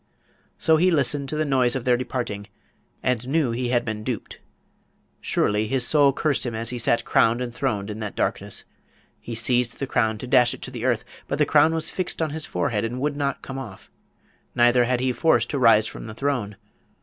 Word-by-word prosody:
So 160 0 +3
he 180 +4 +4
listened 140 -3 +1
to - - -3
the 155 0 0
noise 130 -3 +2
of 130 - -3
their 125 -1 +4
departing, 120 -5 -4 0.6
and 125 -1 0
knew 145 -3 +1
he 120 +2 -2
had 120 -1 +1
been 110 -2 -4
duped. 120 -2 -5 0.8
Surely 105 +1 0
his 130 +1 +1
soul 145 -1 +5
cursed 140 +1 -1
him 120 -3 -4
as 115 +1 -3
he 125 - -4
sat 120 0 +1
crowned 115 +2 +3
and 125 -1 -4
throned 110 -5 -2
in 105 - -7
that 105 -2 -5
darkness! - - -2 0.5
He 115 - -7
seized 120 +1 0
the 135 - -3
crown 110 -4 0
to 115 - -7
dash 125 -1 +4
it - - -14
to 125 - -6
the 120 -2 -5
earth, 120 -4 0 0.2
but 140 - -2
the 150 - +3
crown 150 +2 +4
was 160 -1 0
fixed 185 - -3
on 160 -2 -1
his 155 0 -5
forehead 105 +4 -1
and 120 +3 -3
would 145 +2 -1
not 140 -1 -2
come 135 0 -6
off; 105 -7 -10 0.6
neither 120 0 +4
had 125 0 0
he 130 -1 +1
force 120 -6 +2
to 140 - -3
rise 115 -3 +5
from - - -8
the 110 - -8
throne. 125 -6 -2
125 Hz, 215 wpm, -24 LUFS, 115-140 Hz, 0.8 s, soul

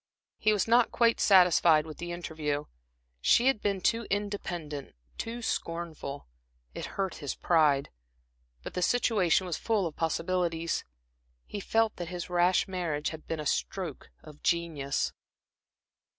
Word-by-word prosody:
He 215 - +3
was 210 -1 +1
not 235 +1 +4
quite 230 -1 +3
satisfied 175 -5 +5
with 155 -1 -9
the 175 0 -5
interview; 155 -4 -3 0.6
she 235 - +4
had 265 -5 +3
been 200 -2 0
too 230 +2 +1
independent, 175 -8 -4 0.2
too 235 +1 -4
scornful. 165 -7 -4 0.5
It - - -5
hurt 195 -2 -1
his 145 -3 -4
pride. 150 -5 +2 0.7
But - - -7
the 180 - -2
situation 195 -4 +2
was 175 -3 -2
full 215 -4 0
of 160 - -4
possibilities. 170 0 -1 0.6
He 205 - -6
felt 225 +2 +1
that 175 - -4
his 180 0 -6
rash 175 +1 +3
marriage 170 -6 -2
had 160 -1 -10
been 165 - -3
a 150 - -4
stroke 170 0 -2
of 150 -1 -13
genius. 160 -5 0
175 Hz, 140 wpm, -29 LUFS, 155-200 Hz, 0.7 s, satisfied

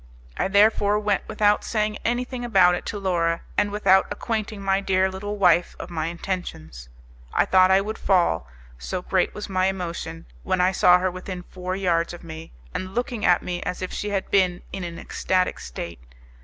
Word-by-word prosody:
I - - 0
therefore 205 +1 +4
went 205 -2 0
without 210 -1 +2
saying 215 -1 -1
anything 245 +1 -2
about 190 -7 +5
it - - -4
to 210 - -3
Laura, 170 -4 0
and 205 0 +2
without 200 -2 +3
acquainting 220 -2 -3
my 195 0 +1
dear 190 -1 +1
little 205 +2 -5
wife 175 -3 +3
of - - -8
my 160 -2 -2
intentions. 165 - -5 0.5
I - - +4
thought 185 0 +5
I 190 +1 +5
would 215 +2 -5
fall, 170 - +2 0.3
so 180 - -4
great 185 -1 0
was 210 - -5
my 185 -1 +1
emotion, 170 -3 -4 0.2
when 185 -1 -1
I 180 +1 +4
saw 180 -1 +6
her 185 0 0
within 185 0 -7
four 185 +1 -5
yards 175 -3 0
from 175 - -13
me, 160 0 -9 0.2
and 185 +1 -5
looking 245 -2 -2
at 175 - +4
me 175 -1 -3
as 180 - -4
if 185 - -5
she 210 - -3
had 195 -2 -2
been 185 -3 +2
in 195 - -4
an 170 -1 -6
ecstatic 185 -1 -1
state. 65 +4 -7
185 Hz, 190 wpm, -24 LUFS, 175-205 Hz, 0.5 s, saw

